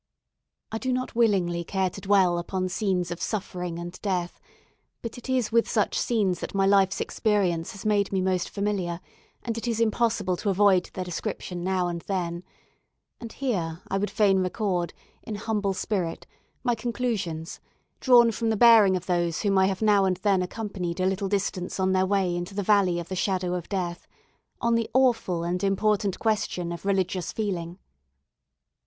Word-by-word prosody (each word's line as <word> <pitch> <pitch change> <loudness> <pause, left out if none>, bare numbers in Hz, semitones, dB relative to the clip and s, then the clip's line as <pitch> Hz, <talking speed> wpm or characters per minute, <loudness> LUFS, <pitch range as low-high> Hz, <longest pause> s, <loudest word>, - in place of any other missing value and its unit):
I 220 - -3
do 260 +1 -1
not 255 0 -2
willingly 190 -7 +2
care 190 +1 -1
to - - -9
dwell 190 -3 +3
upon 185 +1 -2
scenes 180 -3 -1
of 175 - -5
suffering 180 -5 -3
and 175 +1 -7
death, 180 -4 -2 0.6
but 230 - -5
it 245 - -11
is 255 -4 +1
with 230 0 +3
such 210 - +1
scenes 200 -7 +1
that - - -6
my 195 0 +3
life's 195 -1 +3
experience 195 -4 0
has 200 - -10
made 205 -2 +2
me 195 - +1
most 185 -1 0
familiar, 195 -4 -2 0.4
and 230 -1 -3
it 230 - -6
is 230 -1 -1
impossible 225 -4 +1
to 205 - -2
avoid 195 -2 +3
their 185 - -3
description 180 0 -4
now 185 -1 0
and 170 -1 -4
then; 175 -3 -2 0.8
and 230 -1 -8
here 175 -11 -2
I 195 - 0
would 205 - -1
fain 195 -3 +3
record, 185 -2 -1 0.3
in 215 - -6
humble 205 -2 -1
spirit, 185 -5 -2 0.4
my 245 -2 +2
conclusions, 220 -8 -3 0.4
drawn 240 -3 +6
from 225 +1 -1
the 220 - +1
bearing 220 -5 +7
of 180 - -8
those 175 -2 0
whom 200 -2 +2
I 190 - +4
have 195 +2 -2
now 205 -2 +4
and 185 -1 +1
then 195 -1 +2
accompanied 185 -3 -4
a 185 - +1
little 190 +1 0
distance 190 -2 -2
on 190 0 +2
their 190 0 +2
way 190 -3 +1
into 175 +3 -5
the 205 - -1
Valley 190 -4 +3
of 170 - -6
the 190 - -4
Shadow 185 -1 0
of 180 -2 -4
Death, 180 -3 -3 0.5
on 235 0 +1
the 230 -1 +1
awful 235 -10 +2
and 180 +2 -2
important 200 0 +1
question 205 -6 -1
of 170 +2 -7
religious 190 -2 0
feeling. 180 -5 -3
195 Hz, 180 wpm, -26 LUFS, 180-215 Hz, 0.8 s, bearing